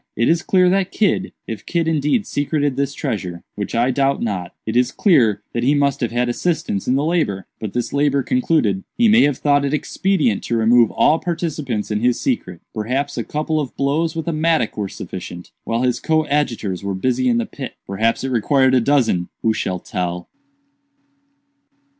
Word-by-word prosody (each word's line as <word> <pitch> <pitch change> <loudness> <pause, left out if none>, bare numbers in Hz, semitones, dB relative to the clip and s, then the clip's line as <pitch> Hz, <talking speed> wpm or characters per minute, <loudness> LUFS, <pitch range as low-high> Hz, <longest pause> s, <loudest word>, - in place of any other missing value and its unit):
It 115 - +2
is 165 0 +3
clear 185 -1 +3
that 190 +1 +2
Kidd—if 190 - -2
Kidd 170 -2 0
indeed 160 - +1
secreted 145 -1 -1
this 140 +1 -1
treasure, 90 -5 -4
which 100 0 -4
I 120 +3 +2
doubt 135 +1 +1
not—it 105 +1 -4
is 125 +1 +3
clear 120 - +3
that 120 - -1
he 135 +5 +3
must 140 -1 +1
have 120 - 0
had 120 +1 0
assistance 155 - -1
in 125 - +2
the 140 +2 +1
labor. 155 - 0
But 110 -3 -5
this 120 -1 -2
labor 140 -1 +2
concluded, 155 - +1
he 235 - +4
may 220 +2 +6
have 145 -3 0
thought 145 -1 +2
it 140 +1 0
expedient 155 - 0
to 115 - 0
remove 115 0 +5
all 160 - +3
participants 155 - -3
in 105 - 0
his 120 +2 +1
secret. 95 - -2
Perhaps 130 +6 -2
a - - -2
couple 155 +1 -2
of 140 -5 -5
blows 155 +4 0
with 160 +1 -4
a 170 - 0
mattock 155 -6 +1
were 100 -2 -3
sufficient, 90 -1 -8
while 115 +2 -1
his 125 -1 +1
coadjutors 145 - 0
were 100 -1 -2
busy 130 - +1
in 235 - +2
the 235 - 0
pit; 140 - -8
perhaps 110 +6 0
it 135 - -2
required 130 +2 +3
a 130 - +4
dozen—who 115 -5 +1
shall 95 -3 -2
tell?" 90 0 -4
135 Hz, 185 wpm, -20 LUFS, 110-155 Hz, -, may